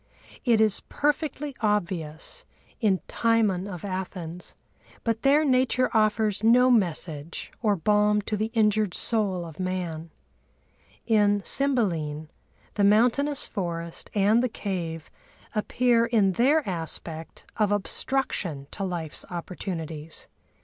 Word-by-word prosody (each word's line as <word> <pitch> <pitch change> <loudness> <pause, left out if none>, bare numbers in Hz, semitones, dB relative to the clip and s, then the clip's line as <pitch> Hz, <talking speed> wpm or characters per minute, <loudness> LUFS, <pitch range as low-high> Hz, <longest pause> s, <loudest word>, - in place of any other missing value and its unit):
It 235 -3 +4
is 215 -2 +3
perfectly 295 -1 -2
obvious 185 - -2 0.4
in 200 -5 +2
Timon 215 -5 +1
of 180 -2 -7
Athens—but 185 +4 -6
there 290 +3 +4
Nature 255 -1 +2
offers 215 -1 +2
no 250 +3 +6
message 170 -7 -1
or 210 -3 +3
balm 210 +3 +3
to 215 - -2
the 215 +2 -1
injured 210 -3 +2
soul 200 -6 0
of 160 0 -11
man. 175 -3 -3 1.0
In 205 -3 +3
Cymbeline 170 - 0 0.4
the 205 - 0
mountainous 245 +8 +3
forest 170 -4 -5
and 210 +3 +4
the 255 - 0
cave 170 -7 -4 0.4
appear 235 +2 +2
in 215 -5 +3
their 275 - +3
aspect 165 -2 -5
of 210 -2 +2
obstruction 205 - -1
to 195 - -5
life's 170 -5 -2
opportunities. 165 -3 -5
205 Hz, 110 wpm, -26 LUFS, 175-230 Hz, 1.0 s, no